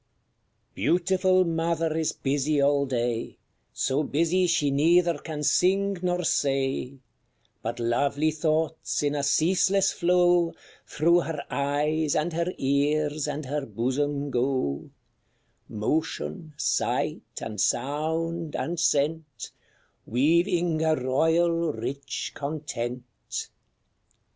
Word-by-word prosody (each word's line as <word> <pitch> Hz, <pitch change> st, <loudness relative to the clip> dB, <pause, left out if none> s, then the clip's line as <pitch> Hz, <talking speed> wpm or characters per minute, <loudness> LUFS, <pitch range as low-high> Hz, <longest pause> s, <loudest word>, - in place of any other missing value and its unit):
_ -, -, -42 dB
Beautiful 185 Hz, +1 st, +2 dB
mother 165 Hz, -1 st, 0 dB
is 160 Hz, -1 st, 0 dB
busy 145 Hz, +2 st, 0 dB
all 140 Hz, 0 st, +3 dB
day, 120 Hz, -2 st, -2 dB, 0.3 s
So 135 Hz, +2 st, 0 dB
busy 170 Hz, +5 st, +1 dB
she 145 Hz, -4 st, +2 dB
neither 170 Hz, +3 st, +3 dB
can 150 Hz, -1 st, -6 dB
sing 195 Hz, +5 st, +2 dB
nor 180 Hz, 0 st, 0 dB
say; 135 Hz, -3 st, 0 dB, 0.6 s
But 115 Hz, +2 st, -4 dB
lovely 140 Hz, +6 st, +1 dB
thoughts, 160 Hz, 0 st, -1 dB
in 145 Hz, 0 st, +1 dB
a 145 Hz, -, -1 dB
ceaseless 185 Hz, +7 st, +3 dB
flow, 175 Hz, -1 st, +3 dB, 0.3 s
Through 170 Hz, +3 st, +3 dB
her 165 Hz, -3 st, -4 dB
eyes, 145 Hz, +2 st, 0 dB
and 160 Hz, +2 st, 0 dB
her 170 Hz, +2 st, -1 dB
ears, 145 Hz, +2 st, 0 dB
and 150 Hz, 0 st, -4 dB
her 145 Hz, +2 st, -2 dB
bosom 140 Hz, +3 st, -2 dB
go 125 Hz, -, -1 dB, 0.8 s
Motion, 155 Hz, -, -3 dB
sight, -, -, 0 dB, 0.2 s
and 105 Hz, -3 st, -4 dB
sound, 160 Hz, +3 st, -1 dB
and 170 Hz, 0 st, -2 dB
scent, 150 Hz, -4 st, 0 dB, 0.6 s
Weaving 170 Hz, -, +2 dB
a 160 Hz, -1 st, +3 dB
royal, 160 Hz, +5 st, +1 dB
rich 140 Hz, +1 st, -4 dB
content. 140 Hz, -5 st, -4 dB
155 Hz, 105 wpm, -26 LUFS, 140-170 Hz, 0.8 s, all